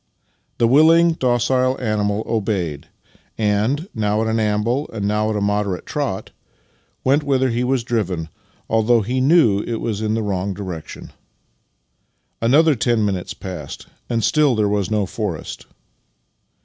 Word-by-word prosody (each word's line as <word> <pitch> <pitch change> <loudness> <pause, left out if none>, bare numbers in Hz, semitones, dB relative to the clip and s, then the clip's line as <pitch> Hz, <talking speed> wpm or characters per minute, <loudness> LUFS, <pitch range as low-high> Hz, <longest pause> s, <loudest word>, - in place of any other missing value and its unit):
The 115 - +3
willing, 165 +6 +5
docile 130 -1 +1
animal 105 -2 -1
obeyed 95 -10 -2 0.5
and, 110 - 0
now 105 0 0
at - - -1
an 110 0 0
amble 110 +6 0
and 105 -3 -3
now 105 +1 0
at 110 - -1
a 105 - -1
moderate 100 -2 -1
trot, - - -3 0.7
went 140 +3 +3
whither 135 -2 +1
he 120 +2 -1
was 125 -1 0
driven, 95 -9 -2 0.4
although 115 +1 +3
he 125 +5 -1
knew 130 - +4
that - - -5
it - - -1
was 110 -3 -3
in 110 0 0
the 115 - -1
wrong 95 -1 -2
direction. 90 -5 -7 1.3
Another 150 +7 +4
ten 120 -3 +1
minutes 95 -1 -3
passed, 90 -9 -8 0.2
and 115 -2 0
still 145 +3 +3
there 105 -1 +1
was 100 -2 0
no 105 -2 +1
forest. 95 -4 -5
110 Hz, 150 wpm, -20 LUFS, 100-125 Hz, 1.3 s, willing